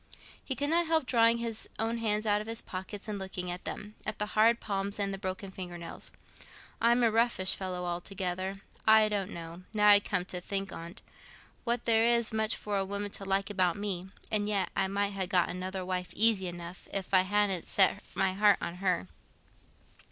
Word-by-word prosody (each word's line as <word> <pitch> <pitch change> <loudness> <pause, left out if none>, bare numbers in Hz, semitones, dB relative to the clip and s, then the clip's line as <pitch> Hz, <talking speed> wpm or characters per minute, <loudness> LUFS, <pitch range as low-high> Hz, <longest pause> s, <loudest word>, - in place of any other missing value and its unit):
He 265 - -3
could 285 +3 0
not 340 0 +3
help 320 -3 +2
drawing 230 -2 +5
his 230 -2 0
own 225 +1 -1
hands 215 -1 0
out 210 -1 +2
of 215 - -8
his 225 0 +1
pocket 195 +3 -7
and 210 -2 -4
looking 185 -2 -4
at 180 - -6
them—at 215 0 -6
the 210 - -1
hard 230 +2 +4
palms 200 -1 -3
and 200 -1 0
the 195 - -5
broken 190 0 -5
finger 180 -2 -7
nails. 170 -1 -4 0.7
"I'm 235 +1 +4
a 230 - +4
roughish 225 -4 +2
fellow, 180 -2 -4
altogether; 185 +2 -3 0.3
I 220 0 +7
don't 200 -2 -1
know, 170 -1 -8
now 210 0 +5
I 205 0 +9
come 195 -3 -2
to 180 -1 -4
think 195 +1 -3
on't, 170 +5 -9 0.6
what 235 0 0
there 225 -1 +4
is 235 -1 +4
much 220 0 +1
for 205 -1 -2
a - - +1
woman 200 +1 -4
to 195 - -4
like 195 +1 0
about 185 -3 +1
me; 190 -3 -3 0.2
and 210 -1 +1
yet 195 -4 +1
I 195 - +1
might 200 +1 -1
ha' 190 -2 -2
got 180 -2 +3
another 185 +1 -4
wife 180 -1 -2
easy 215 -4 +4
enough, 175 +1 -8
if 195 -1 -4
I 185 - +7
hadn't 195 -2 0
set 195 +1 +3
my 190 -1 +1
heart 205 +1 +5
on 170 +1 -5
her. 180 - 0
200 Hz, 200 wpm, -30 LUFS, 185-215 Hz, 0.7 s, I